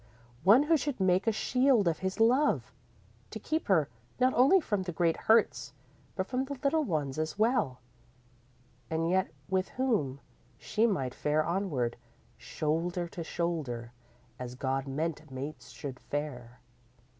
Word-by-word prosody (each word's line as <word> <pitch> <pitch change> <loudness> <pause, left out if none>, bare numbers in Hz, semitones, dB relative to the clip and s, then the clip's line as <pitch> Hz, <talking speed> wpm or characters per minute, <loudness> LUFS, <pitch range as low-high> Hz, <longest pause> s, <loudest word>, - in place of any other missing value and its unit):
One 220 +9 +7
who 320 +2 +4
should 285 -3 -3
make 185 +2 +2
a - - +5
shield 250 -1 +2
of 165 -2 +1
his 190 +2 -3
love, 255 +6 +3 0.6
to - - -6
keep 315 +1 -2
her 160 -7 +3 0.3
not 255 +1 +4
only 275 +10 +6
from 210 - -1
the 180 -1 -4
great 165 0 +1
hurts 225 0 +2 0.4
but 190 - -1
from 255 +4 -1
the 280 0 -6
little 305 +3 +2
ones 155 - -2
as 155 +4 -2
well, 215 - +1 1.1
and 160 +1 0
yet 190 +1 +2 0.2
with 190 -1 0
whom 210 - 0 0.4
she 220 - +1
might 135 - -1
fare 150 +1 +1
onward, 165 -10 -1 0.4
shoulder 170 +3 -2
to 170 - -6
shoulder, 150 -9 -3 0.5
as 125 0 -6
God 135 +1 -2
meant 155 +2 -3
mates 130 -1 -7
should 125 +1 -7
fare. 125 -5 -5
175 Hz, 145 wpm, -30 LUFS, 140-225 Hz, 1.1 s, One